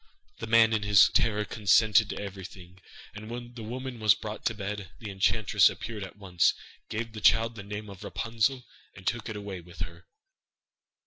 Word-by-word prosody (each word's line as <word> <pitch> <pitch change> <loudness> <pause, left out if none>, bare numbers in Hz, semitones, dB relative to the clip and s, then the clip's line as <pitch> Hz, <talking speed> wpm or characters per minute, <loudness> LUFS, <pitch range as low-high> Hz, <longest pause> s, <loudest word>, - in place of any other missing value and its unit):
The 115 - -5
man 115 0 +5
in 110 - +1
his 105 -1 +6
terror 105 -2 +1
consented 110 0 +3
to - - -5
everything, 95 -2 -9 0.3
and 105 +2 -9
when 120 0 -7
the 120 - -9
woman 125 +2 -6
was 110 -3 +5
brought 110 0 -7
to 120 - 0
bed, 100 -2 -5
the 105 +3 -7
enchantress 100 +2 +3
appeared 110 -3 -6
at 95 - -10
once, 95 -4 +2 0.3
gave 115 +1 -4
the 110 - -7
child 115 +2 +4
the 110 - -8
name 105 +1 -7
of 100 -2 -11
Rapunzel, 115 +3 -1 0.3
and 95 - -13
took 120 -1 -2
it 110 - -5
away 100 -3 -6
with 85 -1 -13
her. 85 +1 -7
105 Hz, 185 wpm, -28 LUFS, 100-115 Hz, 0.3 s, his